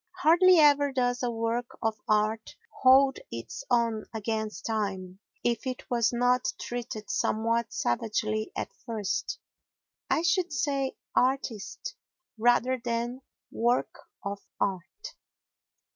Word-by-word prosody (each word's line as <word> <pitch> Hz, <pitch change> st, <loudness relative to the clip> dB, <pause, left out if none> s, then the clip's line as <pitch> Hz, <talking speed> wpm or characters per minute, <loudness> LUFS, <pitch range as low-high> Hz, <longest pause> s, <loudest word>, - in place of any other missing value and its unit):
Hardly 355 Hz, +3 st, +7 dB
ever 290 Hz, -2 st, +5 dB
does 245 Hz, -2 st, 0 dB
a 245 Hz, -, 0 dB
work 230 Hz, +1 st, -2 dB
of 220 Hz, -1 st, -1 dB
art 215 Hz, +1 st, +1 dB, 0.3 s
hold 265 Hz, +1 st, +6 dB
its 115 Hz, 0 st, -6 dB
own 230 Hz, -3 st, +1 dB
against 220 Hz, 0 st, -3 dB
time 195 Hz, -4 st, -2 dB, 0.2 s
if 240 Hz, +2 st, 0 dB
it 255 Hz, -1 st, -5 dB
was 235 Hz, -2 st, +3 dB
not 245 Hz, +1 st, +2 dB
treated 235 Hz, -3 st, -5 dB
somewhat 230 Hz, +1 st, 0 dB
savagely 215 Hz, -, -1 dB
at -, -, -4 dB
first—I 225 Hz, -, -4 dB
should 345 Hz, 0 st, +2 dB
say 275 Hz, 0 st, -1 dB, 0.2 s
"artist" 250 Hz, -5 st, -1 dB, 0.4 s
rather 245 Hz, +2 st, +3 dB
than 240 Hz, +2 st, -2 dB, 0.3 s
"work 240 Hz, +2 st, +1 dB, 0.3 s
of 200 Hz, 0 st, -3 dB, 0.2 s
art." 190 Hz, -, -3 dB
235 Hz, 110 wpm, -28 LUFS, 215-255 Hz, 0.4 s, Hardly